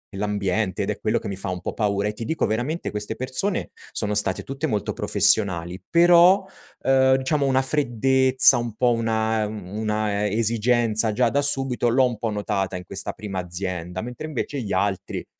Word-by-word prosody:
l'ambiente 100 -1 -2
ed 95 - -2
è 105 - -3
quello 110 +2 0
che 110 - -7
mi 100 - -4
fa 95 - -1
un 90 -1 -4
po' - - -5
paura. 100 -1 -1
E - - -5
ti 115 +2 -7
dico, 160 +4 -1
veramente, 125 +10 -3
queste 105 0 -4
persone 130 +10 -2 0.2
sono 105 -1 -1
state 100 -3 +2
tutte 135 +4 -4
molto 105 -8 -2
professionali 90 -4 +1
però, 175 +3 +5 0.3
uhm, 130 0 +3
diciamo 140 +2 0
una 130 -1 +2
freddezza, 130 -1 +4
un 120 -2 -4
po' 120 +2 +2
una 110 -1 0
una 105 +1 -3
e 105 0 -2
esigenza, 115 -1 +2
già 120 +2 +2
da 140 +4 0
subito, 135 -4 +3
l'ho 130 +3 +3
un 120 -2 -5
po' 110 0 -3
notata 100 -2 -2
in 90 - -6
questa 95 +2 -4
prima 100 -3 -6
azienda. 90 0 -5
Mentre 125 +6 -7
invece, 145 -1 -4
gli 110 -6 -4
altri, 95 0 -2
110 Hz, 185 wpm, -23 LUFS, 100-130 Hz, 0.3 s, però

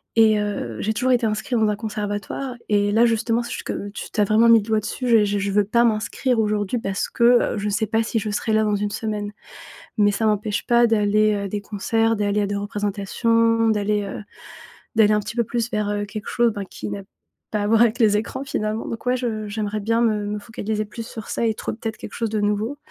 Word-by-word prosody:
et 220 -2 +5
heu, 200 - -3
j'ai 220 - 0
toujours 255 +4 +1
été 245 -2 +3
inscrit 220 +3 -2
dans 220 -2 +3
un 210 - 0
conservatoire 210 +4 -4 0.2
et 205 -1 +2
là 225 +3 +4
justement 230 0 +1
c - - -7
ch - - -5
que 205 - -4
tu - - -8
tu 215 - 0
as - - +4
vraiment 220 +3 +4
mis 230 -1 +8
le 205 - -6
doigt 220 -1 +2
dessus 250 +4 -4
j'ai 225 -3 +5
je 205 0 -1
je 200 0 -1
veux 205 +1 +3
pas 235 +4 +3
m'inscrire 230 +3 0
aujourd'hui 210 +1 0
parce 195 -3 -2
que, - - -2 0.3
heu, - - -3
je 205 - -2
sais 215 +2 0
pas 225 +2 +1
si 225 0 -1
je 215 - -4
serai 220 +2 -1
là 220 0 +3
dans 210 -1 +1
une 205 0 -2
semaine 210 -1 -3 0.7
mais 205 -1 +4
ça 220 +2 0
m'empêche 210 0 -1
pas 240 0 +5
d'aller 215 -1 +3
à 200 -1 -3
des 210 - -2
concerts, 225 +2 0
d'aller 205 0 +1
à - - +1
des 200 - -2
représentations, 225 +3 +1
d'aller, 210 -1 +1
heu, 200 - -6 0.7
d'aller 215 -1 +5
un 210 - +2
petit 215 +2 -7
peu 235 - +3
plus 235 +1 -2
vers, 210 -2 -1
heu, 205 0 -1
quelque 210 +1 -7
chose, 240 -1 +2
ben, 200 -2 -5
qui - - -6
n'a 200 0 -4 0.5
pas 210 - 0
à - - 0
voir 225 +1 +4
avec 235 -1 +4
les 215 -3 +4
écrans, 225 +5 -4
finalement 215 -5 -2
donc 230 - -6
ouais 250 +1 +2
je, 220 -4 -3
j'aimerais 210 0 -3
bien 230 +3 +1
me 215 -3 +1
me 210 +1 -2
focaliser 215 -1 -3
plus 225 +2 -8
sur 220 -1 -9
ça - - -1
et 220 - 0
trou - - -4
peut-être 225 0 -5
quelque - - -9
chose 230 -1 -2
de 215 0 -1
nouveau, 210 +6 -1
215 Hz, 245 wpm, -22 LUFS, 205-225 Hz, 0.7 s, mis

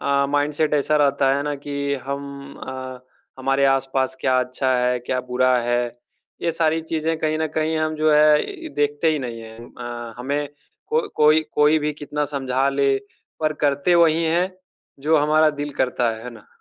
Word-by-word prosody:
अ, 140 0 +1
mindset 150 +1 +1
ऐसा 150 +1 +2
रहता 140 -2 +3
है 140 - -1
ना 145 0 -2
कि 145 - -4 0.3
हम 140 0 -6
अ, 130 -1 -6 0.4
हमारे 135 +1 +1
आस-पास 135 0 -1
क्या 130 0 +2
अच्छा 125 +1 -1
है, 125 0 +1
क्या 125 +1 -2
बुरा 130 0 +3
है, 120 0 +2 0.6
ये 170 - +1
सारी 160 0 +1
चीजें 160 +1 0
कहीं 155 0 0
न 160 - 0
कहीं 160 +1 +1
हम 155 0 -1
जो 155 0 +3
है 155 - +3
देखते 145 +2 +1
ही 150 - -1
नहीं 120 -3 -5
हैं 110 0 -11 0.2
अ, 120 -1 -6
हमें 140 +3 -2 0.4
को 460 -1 +1
कोई 155 +1 +5
कोई 150 +1 +4
भी 150 0 -1
कितना 150 0 -3
समझा 135 0 0
ले 140 0 +2 0.5
पर 155 -1 +1
करते 145 +5 +2
वही 165 -1 +4
हैं 175 +3 +1 0.5
जो 155 +3 +3
हमारा 155 +1 +4
दिल 145 0 -3
करता 125 -2 +1
है, 110 +1 -7
है 125 - -6
ना? 115 -3 -15
145 Hz, 180 wpm, -22 LUFS, 130-155 Hz, 0.6 s, कोई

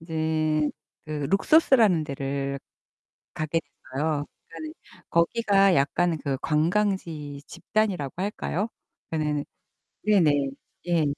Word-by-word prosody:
이제 155 -2 0 0.4
그 150 -2 -3
룩소스라는 215 - +5
데를 140 -1 -3 0.8
가게 155 +1 -1
됐어요. 145 0 -3 0.2
그러니까는 155 -2 -8 0.4
거기가 195 +2 +3
약간 165 +4 +2
그 140 -2 -1
관광지 160 -3 0
집단이라고 195 -11 -1
할까요? 205 0 -2 0.4
그러니까는 150 -2 -1 0.6
네네. 200 -7 +4
네네. 140 -1 0 0.4
예. 170 -3 +3
160 Hz, 250 characters per minute, -26 LUFS, 145-185 Hz, 0.8 s, 룩소스라는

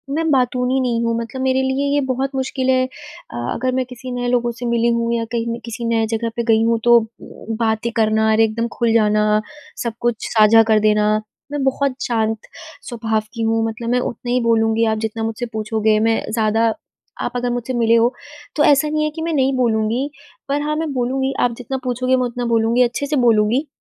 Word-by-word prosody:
मैं 325 +1 0
बातूनी 250 0 +1
नहीं 235 -2 0
हूँ, 230 0 0
मतलब 235 +3 -6
मेरे 260 0 +2
लिए 265 +2 0
ये - - +3
बहुत 265 +1 -1
मुश्किल 260 0 -1
है 255 0 +3
अ, 300 - -13 0.2
अगर 255 +2 -1
मैं 260 0 0
किसी 250 +1 -9
नए 245 0 -2
लोगों 240 -1 +1
से 240 +1 -7
मिली 235 0 +1
हूँ 235 0 0
या 230 -1 -1
कहीं 235 -1 -2
मैं 230 - -4
किसी 235 0 -5
नए 225 -1 +1
जगह 230 +1 -1
पे 235 - 0
गई 225 -1 +3
हूँ 230 0 +2
तो 240 0 +7 0.6
बातें 225 0 0
करना 220 0 +2
और 220 - +2
एकदम 225 +1 +1
खुल 235 -2 +1
जाना, 210 -1 +3 0.4
सब 235 -2 -2
कुछ 240 -2 -1
साझा 225 0 +6
कर 220 -1 +4
देना, 210 0 +3 0.5
मैं 290 -1 -2
बहुत 270 0 0
शांत 225 -2 0 0.5
स्वभाव 225 -3 -1
की 230 - -5
हूँ। 225 0 +1
मतलब 230 +1 -5
मैं 250 +1 +2
उतना 240 0 -4
ही 250 - +2
बोलूँगी 225 0 +2
आप 220 -1 0
जितना 225 +1 -4
मुझसे 225 +2 -3
पूछोगे, 215 0 +1
मैं 225 +1 +2
ज़्यादा 225 0 +2 0.6
आप - - -2
अगर 245 0 -1
मुझसे 245 +1 -3
मिले 230 -1 +3
हो, 235 +2 +3 0.4
तो 300 - +2
ऐसा 290 +1 +4
नहीं 305 0 0
है 305 - +1
कि 325 - -5
मैं 330 0 -2
नहीं 270 -2 +2
बोलूँगी, 235 +2 0 0.4
पर 285 +1 0
हाँ 300 +1 -1
मैं 315 -1 -2
बोलूँगी, 265 +2 -1
आप 245 - +2
जितना 260 +2 -4
पूछोगे 255 +1 0
मैं 255 - +1
उतना 245 0 -4
बोलूँगी, 230 +2 +3
अच्छे 245 +4 -1
से 295 +1 -1
बोलूँगी। 230 +6 +2
235 Hz, 210 wpm, -19 LUFS, 225-260 Hz, 0.6 s, तो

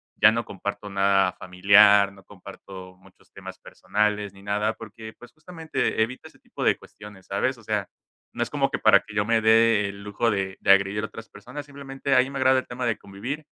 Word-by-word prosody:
ya 110 - +5
no 115 0 -2
comparto 100 +1 -6
nada 95 -1 +2
familiar, 100 +2 +4
no 100 -1 -18
comparto 95 -1 -12
muchos 95 - -24
temas - - -10
personales, 105 -1 -2
ni 100 - -17
nada 105 +2 -1
porque, 110 0 -11
pues, 120 0 -15
justamente 160 -5 -3
evita 120 +3 -3
ese - - -24
tipo - - -8
de - - +2
cuestiones, 105 -2 -14
¿sabes? 125 +7 -2
O 115 - -17
sea, 105 -2 -3 0.4
no - - -6
es 120 - -1
como 135 -1 -1
que - - -3
para 100 -2 +5
que 105 +1 -14
yo 105 -1 +1
me 115 0 +1
dé 110 -2 +4
el 100 0 -10
lujo 105 +3 -1
de 95 -1 -3
de - - +4
agredir 100 +2 +2
a - - -3
otras 110 0 -11
personas, 125 +8 -10
simplemente 140 -1 -4
ahí 130 +1 +3
me 140 - -6
agrada 130 0 +3
el - - -9
tema 125 +1 -5
de 115 -3 0
convivir, 125 +10 -7
105 Hz, 210 wpm, -24 LUFS, 100-120 Hz, 0.4 s, ya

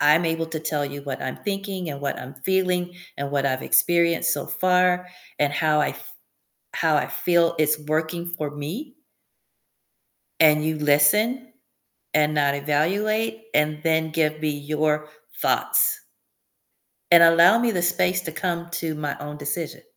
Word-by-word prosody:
I'm 150 +4 +4
able 165 0 -1
to 160 -1 -5
tell 150 -2 -2
you 140 0 -7
what 140 -1 -5
I'm 130 - -4
thinking 195 -3 -4
and 140 - -7
what 140 - -3
I'm 130 - -9
feeling 180 -2 0 0.2
and 140 0 -4
what 140 -1 0
I've 130 -1 -1
experienced 170 -1 +2
so - - -3
far 180 0 +1 0.3
and 145 -1 +1
how 155 0 +2
I - - +1
f - - -11 0.7
how - - +1
I - - +1
feel 170 -1 +1
it's 155 0 +1
working 165 +3 -2
for 150 -2 -4
me 180 - -7 1.5
and 150 -1 +5
you 160 0 -1
listen 210 - +2 0.6
and 155 0 +2
not 145 -2 +2
evaluate, 205 +10 -1
and 150 0 +1
then 160 -1 +1
give 155 -1 0
me 155 - 0
your 150 +1 -1 0.3
thoughts 440 -1 +1 1.1
and 170 -1 +8
allow 170 +6 +6
me 235 0 +1
the 180 -3 -1
space 180 +1 +1
to 165 - -5
come 170 0 -3
to 165 -2 -3
my 150 -2 -4
own 150 0 -7
decision? 150 +2 -5
160 Hz, 155 wpm, -23 LUFS, 150-180 Hz, 1.5 s, and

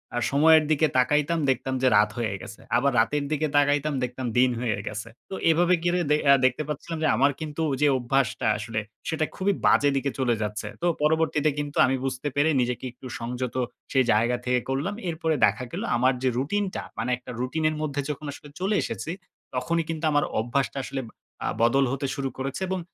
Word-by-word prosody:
আ - - 0
সময়ের 155 +2 +6
দিকে 155 +1 +4
তাকাইতাম, 150 +5 +2
দেখতাম 130 +1 0
যে 130 - +4
রাত 105 0 +4
হয়ে 110 -4 -1
গেছে। 110 - -10 0.2
আবার 140 +3 +2
রাতের 145 +6 +1
দিকে 155 0 +1
তাকাইতাম, 145 +1 +2
দেখতাম 125 +1 -4
দিন 130 0 +5
হয়ে 115 -4 0
গেছে। 105 +2 -5 0.2
তো 190 - -4
এভাবে 175 +2 +4
কিরে 175 +1 +2
দে 150 - +5
এ্যা 140 - +7
দেখতে 130 +4 +1
পাচ্ছিলাম 155 +2 -4
যে - - +3
আমার 140 +2 +4
কিন্তু 155 0 -6
ঐ - - -1
যে 150 - +5
অভ্যাসটা 125 -2 0
আসলে, 110 +1 -3 0.3
সেটা 160 -1 0
খুবই 195 +1 +1
বাজে 145 - +5
দিকে 140 +1 0
চলে 125 -3 +2
যাচ্ছে। 105 0 -3
তো - - -1 0.2
পরবর্তীতে 155 0 +2
কিন্তু 145 0 -4
আমি 130 - +1
বুঝতে 135 +2 -3
পেরে 145 +2 +3
নিজেকে 125 +1 -2
একটু 130 +1 -11
সংযত 125 +1 -4 0.4
সেই 130 -1 +4
জায়গা 120 +3 +2
থেকে 125 0 +2
করলাম। 145 +10 -1
এরপরে 160 -1 -1
দেখা 105 +4 0
গেল - - -4
আমার 130 +2 +3
যে 130 - +3
রুটিনটা, 190 +8 -1 0.2
মানে 115 +3 -2
একটা 125 - -10
রুটিনের 155 +5 0
মধ্যে 145 -2 -1
যখন 150 +1 -4
আসলে 145 - -12
চলে 195 +3 +1
এসেছি, 165 - -4 0.4
তখনই 165 +6 0
কিন্তু 160 0 -2
আমার 145 -1 +3 0.2
অভ্যাসটা 130 +5 -1
আসলে 135 - -4 0.4
আ - - 0
বদল 135 +4 +4
হতে 135 +1 -2
শুরু 135 -1 -2
করেছে 135 +5 -4
এবং 190 0 -2
140 Hz, 195 wpm, -25 LUFS, 125-155 Hz, 0.4 s, এ্যা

